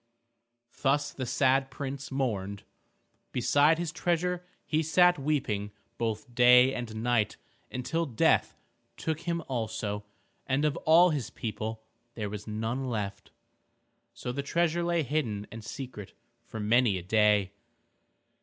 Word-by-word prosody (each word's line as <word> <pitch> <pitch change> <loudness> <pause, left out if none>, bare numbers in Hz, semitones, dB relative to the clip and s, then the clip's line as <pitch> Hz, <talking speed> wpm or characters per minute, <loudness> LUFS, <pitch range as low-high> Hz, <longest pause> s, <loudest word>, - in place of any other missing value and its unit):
Thus 145 +1 +1
the 130 -2 -4
sad 135 +1 +2
prince 140 -1 -5
mourned. 100 -7 -2 0.7
Beside 145 +5 +4
his 170 -2 -2
treasure 175 +1 -1 0.2
he 155 0 +1
sat 175 +2 +4
weeping 130 -9 -1 0.3
both 115 +2 -3
day 125 +2 +7
and 110 -3 -5
night 120 -3 +1 0.3
until 155 +7 -2
death 115 -5 +2 0.4
took 160 -1 -2
him 170 0 -2
also, 110 -4 -3 0.4
and 135 +3 +1
of 150 - +1
all 170 +3 +7
his 135 -6 -2
people 110 -2 -5 0.3
there 105 -3 -4
was 105 +1 -7
none 115 +5 -2
left. 100 -3 -4 0.8
So 125 - -5
the 140 +3 -2
treasure 170 +3 +1
lay 170 -1 +1
hidden 120 -8 -2
and 115 -1 -8
secret 120 -4 -7 0.3
for 110 - -7
many 110 -1 +3
a 90 - -6
day. 105 0 +3
125 Hz, 130 wpm, -29 LUFS, 110-150 Hz, 0.8 s, day